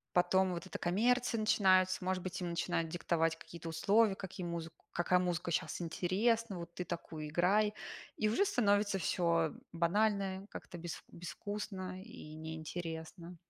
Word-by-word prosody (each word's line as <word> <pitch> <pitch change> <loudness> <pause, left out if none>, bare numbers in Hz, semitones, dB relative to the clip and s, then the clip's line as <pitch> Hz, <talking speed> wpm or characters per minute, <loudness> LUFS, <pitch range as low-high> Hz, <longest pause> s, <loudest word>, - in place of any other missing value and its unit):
Потом 185 +1 +4
вот 170 - -5
эта - - -6
коммерция 235 +6 +2
начинается. 185 -3 +4
Может 185 -1 0
быть, 185 - -4
им 180 -2 -2
начинают 165 -1 0
диктовать 165 -1 +1
какие-то 170 -1 -9
условия: 195 +6 +3
какие 185 -2 -6
музыку 165 -1 -5 0.2
какая 180 +1 +3
музыка 175 -1 -1
щас 170 - -1
интересна, 195 +5 +1
вот 170 0 -8
ты 180 - -4
такую 165 -3 -5
и - - -4
играй. 200 +6 +3 0.4
И 215 - +1
уже 315 - +3
становится 205 - +3
всё 170 -3 +2 0.2
банальное, 195 +2 +1
как-то 175 - -8
без 170 0 -6
безвкусно 185 +1 -5
и 210 -8 -10
неинтересно. 160 +2 -6
180 Hz, 145 wpm, -35 LUFS, 170-200 Hz, 0.4 s, Потом